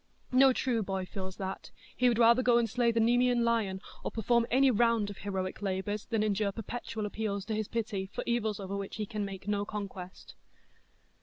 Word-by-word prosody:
No 265 Hz, +1 st, +6 dB
true 245 Hz, -2 st, 0 dB
boy 190 Hz, -2 st, -2 dB
feels 190 Hz, 0 st, -6 dB
that; 190 Hz, 0 st, -5 dB, 0.3 s
he 250 Hz, 0 st, +4 dB
would 235 Hz, -, +1 dB
rather 235 Hz, +1 st, +6 dB
go 245 Hz, -1 st, +4 dB
and 235 Hz, -1 st, +2 dB
slay 240 Hz, 0 st, +2 dB
the 230 Hz, -, 0 dB
Nemean 240 Hz, +1 st, +3 dB
lion, 220 Hz, -5 st, +1 dB, 0.2 s
or -, -, -1 dB
perform 235 Hz, +1 st, +1 dB
any 265 Hz, +2 st, +5 dB
round 230 Hz, -2 st, +2 dB
of 200 Hz, -, -11 dB
heroic 190 Hz, -1 st, -3 dB
labours, 200 Hz, +1 st, -2 dB
than 220 Hz, -2 st, 0 dB
endure 205 Hz, -1 st, +1 dB
perpetual 225 Hz, 0 st, -5 dB
appeals 205 Hz, -1 st, -3 dB
to 225 Hz, -, -3 dB
his 215 Hz, -1 st, -2 dB
pity, 215 Hz, -4 st, -2 dB
for -, -, -5 dB
evils 220 Hz, -3 st, 0 dB
over 195 Hz, 0 st, -4 dB
which 200 Hz, -1 st, -5 dB
he 215 Hz, -, -3 dB
can 210 Hz, -1 st, -3 dB
make 195 Hz, 0 st, -7 dB
no 205 Hz, -1 st, 0 dB
conquest. 195 Hz, -3 st, -7 dB
215 Hz, 200 wpm, -31 LUFS, 195-235 Hz, 0.3 s, No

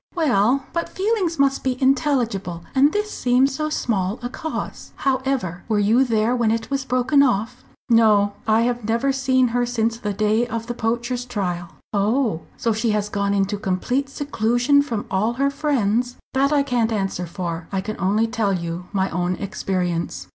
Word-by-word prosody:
"Well, 265 Hz, -, +2 dB
but 335 Hz, 0 st, -2 dB
feelings 380 Hz, -4 st, 0 dB
must 275 Hz, -1 st, +2 dB
be 255 Hz, -1 st, -1 dB
intelligible. 245 Hz, -, +1 dB
And 280 Hz, +2 st, +5 dB
this 420 Hz, +2 st, -2 dB
seems 255 Hz, +2 st, +2 dB
so 305 Hz, +3 st, -2 dB
small 210 Hz, -8 st, -1 dB
a 245 Hz, -, -2 dB
cause. 320 Hz, +5 st, -6 dB
However, 260 Hz, -10 st, -1 dB
were 215 Hz, -, +2 dB
you 215 Hz, +5 st, +4 dB
there 230 Hz, -1 st, +1 dB
when 235 Hz, -3 st, +1 dB
it 225 Hz, +4 st, -2 dB
was 275 Hz, -1 st, -1 dB
broken 260 Hz, +3 st, +3 dB
off?" 230 Hz, -5 st, 0 dB, 0.2 s
"No; 215 Hz, -3 st, +4 dB
I 220 Hz, +1 st, +4 dB
have 240 Hz, 0 st, 0 dB
never 230 Hz, +5 st, +1 dB
seen 260 Hz, -2 st, +2 dB
her 245 Hz, +1 st, +1 dB
since 230 Hz, -1 st, -1 dB
the 210 Hz, -3 st, -2 dB
day 215 Hz, +3 st, +1 dB
of 230 Hz, -1 st, -4 dB
the 240 Hz, -, -4 dB
poacher's 240 Hz, +2 st, -2 dB
trial." 185 Hz, -8 st, -3 dB, 0.3 s
"Oh! 210 Hz, -2 st, +1 dB, 0.2 s
So 230 Hz, -, 0 dB
she 220 Hz, +2 st, 0 dB
has 210 Hz, 0 st, -2 dB
gone 200 Hz, 0 st, 0 dB
into 200 Hz, +1 st, 0 dB
complete 220 Hz, +8 st, -1 dB
seclusion 275 Hz, 0 st, +2 dB
from 235 Hz, -7 st, -3 dB
all 210 Hz, +5 st, +1 dB
her 275 Hz, +3 st, +1 dB
friends?" 250 Hz, -5 st, 0 dB, 0.2 s
"That 275 Hz, +2 st, +2 dB
I 290 Hz, -2 st, +3 dB
can't 240 Hz, -4 st, 0 dB
answer 195 Hz, -4 st, -2 dB
for. 170 Hz, -1 st, -5 dB
I 195 Hz, -, -1 dB
can 215 Hz, +3 st, -4 dB
only 205 Hz, +4 st, +2 dB
tell 225 Hz, -4 st, 0 dB
you 170 Hz, 0 st, -4 dB
my 195 Hz, -2 st, +1 dB
own 180 Hz, +1 st, -1 dB
experience." 175 Hz, -, -3 dB
230 Hz, 175 wpm, -22 LUFS, 200-265 Hz, 0.3 s, And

